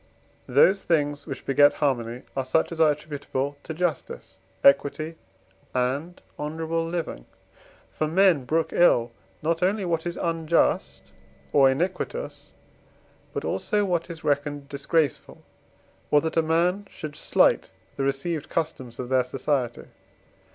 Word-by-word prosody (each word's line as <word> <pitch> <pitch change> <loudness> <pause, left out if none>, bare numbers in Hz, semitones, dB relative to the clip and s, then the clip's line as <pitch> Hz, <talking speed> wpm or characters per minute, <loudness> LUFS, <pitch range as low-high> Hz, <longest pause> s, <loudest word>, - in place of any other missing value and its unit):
Those 195 +1 +5
things, 145 -3 0
which 135 - -6
beget 145 +1 +5
harmony, 125 -4 -1
are 135 - 0
such 130 +7 +1
as 165 -1 -2
are 155 - +6
attributable 145 -2 -4
to - - -8
justice, 160 - -3 0.2
equity, 145 +3 +3 0.6
and 140 +8 -1 0.2
honourable 160 +2 -2
living. 165 - -4 0.6
For 155 - -1
men 170 -4 +4
brook 160 +4 0
ill 120 -9 +4 0.3
not 165 +2 0
only 195 +2 +1
what 170 -1 -1
is 170 - -4
unjust 165 - 0 0.5
or 135 -2 +6
iniquitous, 180 - -3 0.8
but - - -4
also 210 -1 0
what 175 -3 -1
is 165 -1 -8
reckoned 145 -1 -1
disgraceful, 145 +1 -1 0.7
or 150 - +5
that 160 - -3
a 165 - +4
man 175 +5 +1
should 155 -2 -8
slight - - +2 0.3
the - - -4
received 140 +3 -2
customs 130 -7 -3
of 125 - -5
their 130 -1 +3
society. 125 -1 -2
155 Hz, 130 wpm, -25 LUFS, 140-165 Hz, 0.8 s, are